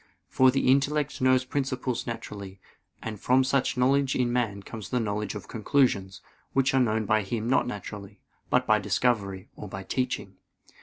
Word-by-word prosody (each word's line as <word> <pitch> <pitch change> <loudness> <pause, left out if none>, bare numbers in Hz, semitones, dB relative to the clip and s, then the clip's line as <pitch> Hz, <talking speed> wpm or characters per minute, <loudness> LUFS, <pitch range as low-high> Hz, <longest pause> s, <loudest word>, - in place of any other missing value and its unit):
For 130 0 +5
the 135 0 +1
intellect 140 +2 +2
knows 130 0 +4
principles 130 -2 -2
naturally; 100 -4 -7 0.4
and 110 -2 -5
from 130 +5 +3
such 130 -1 +1
knowledge 135 +2 +2
in 120 -2 +1
man 110 -5 -1
comes 105 -1 -8
the 125 - 0
knowledge 105 -2 -2
of 100 -2 -7
conclusions, 110 -5 +1 0.3
which 135 0 +2
are 135 - +4
known 110 -2 +1
by 110 +1 +3
him 110 +3 -3
not 130 +3 +2
naturally, 105 -3 -7 0.3
but - - +3
by - - +4
discovery, 100 -6 0
or 105 - -8
by 95 0 -6
teaching. 125 +5 -3
120 Hz, 165 wpm, -27 LUFS, 105-130 Hz, 0.4 s, For